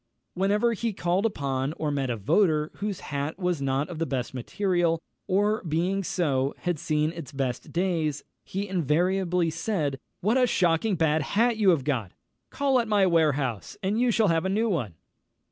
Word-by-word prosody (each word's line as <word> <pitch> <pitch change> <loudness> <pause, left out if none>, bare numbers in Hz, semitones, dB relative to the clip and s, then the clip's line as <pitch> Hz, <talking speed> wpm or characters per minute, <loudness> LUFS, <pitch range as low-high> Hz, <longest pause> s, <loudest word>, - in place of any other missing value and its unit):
Whenever 205 +5 +2
he 230 0 -2
called 185 +4 +1
upon 140 -6 -2
or 155 -2 -2
met 140 -2 -1
a 120 - -1
voter 155 - +2
whose 205 -2 -3
hat 145 +3 -3
was 180 -5 -1
not 135 +2 0
of 175 -3 -7
the 165 - -1
best 125 -3 -3
material, 170 - 0 0.3
or, 205 +3 +1
being 180 +4 0
so, 140 -7 0
had 175 -4 -1
seen 155 +1 0
its 165 -4 -8
best 135 -3 -3
days, 165 -5 0 0.2
he 200 +2 -4
invariably 180 0 +1
said, 160 -5 -2 0.2
"_What 230 +6 +3
a 250 - +4
shocking 180 +1 +2
bad 160 -2 +2
hat 225 - +1
you 205 -3 +4
have 160 -7 +3
got; 125 -10 -2 0.4
call 275 -2 +2
at 235 - -1
my 205 -2 +3
warehouse, 150 - +1
and 205 +5 +1
you 250 - +3
shall 220 -3 +3
have 165 0 +2
a 190 - -1
new 220 +4 +1
one! 120 - -2
170 Hz, 180 wpm, -26 LUFS, 145-195 Hz, 0.4 s, a